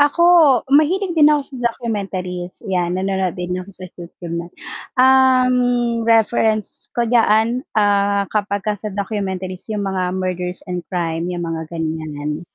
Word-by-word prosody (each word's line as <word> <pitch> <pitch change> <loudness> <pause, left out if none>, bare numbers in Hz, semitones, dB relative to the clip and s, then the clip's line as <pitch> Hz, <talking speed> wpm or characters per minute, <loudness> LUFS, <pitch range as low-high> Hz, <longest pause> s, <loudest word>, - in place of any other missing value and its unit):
Ako, 290 +4 +3 0.5
mahilig 350 +6 +3
din 305 -3 +5
ako 295 -2 0
sa 245 -2 0
documentaries 190 -6 -5
yan, 180 -3 -1
nanonood 190 -2 -1
din 180 +1 -3
ako 185 +2 -11
sa 185 - -9
YouTube 170 -1 -10
niyan. 170 +1 -10 0.4
Um, 260 -1 +5 0.5
reference 220 -1 +1
ko 240 - +2
diyaan, 230 0 +2 0.2
ah, 200 -1 +2
kapagka 205 -1 -2
sa 215 - -4
documentaries 190 -2 -4
yung 210 -2 -2
mga 185 -1 -2
murders 180 -1 -4
and 180 -1 -4
crime, 170 -1 -2
yung 175 -1 -3
mga 165 -1 -4
ganiyan. 155 -2 -4
195 Hz, 140 wpm, -19 LUFS, 180-230 Hz, 0.5 s, din